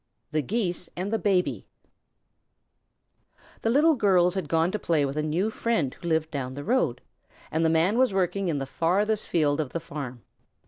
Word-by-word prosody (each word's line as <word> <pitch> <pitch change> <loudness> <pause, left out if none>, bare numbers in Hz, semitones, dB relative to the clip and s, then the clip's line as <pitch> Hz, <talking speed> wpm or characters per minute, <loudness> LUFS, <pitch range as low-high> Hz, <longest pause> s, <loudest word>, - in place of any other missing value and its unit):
THE 155 0 +1
GEESE 180 - -2
AND 195 +4 -3
THE 225 - +1
BABY 190 -3 0 1.9
The 225 - 0
Little 300 +7 +5
Girls 185 - +3
had 185 -6 -3
gone 165 +3 +2
to 215 - -2
play 160 -6 +1
with 135 +1 -4
a 150 - 0
new 170 +8 0
friend 220 - 0
who 175 - -9
lived 160 -1 0
down 130 -3 -4
the 145 - -6
road, 170 - +1 0.5
and 160 +1 +1
the 160 - +3
Man 170 +8 +2
was 260 -3 +4
working 190 0 0
in 155 - 0
the 135 - -2
farthest 200 +9 0
field 150 -2 +1
of 145 - -6
the 170 - -1
farm. 140 -7 -7
170 Hz, 185 wpm, -26 LUFS, 150-200 Hz, 1.9 s, Little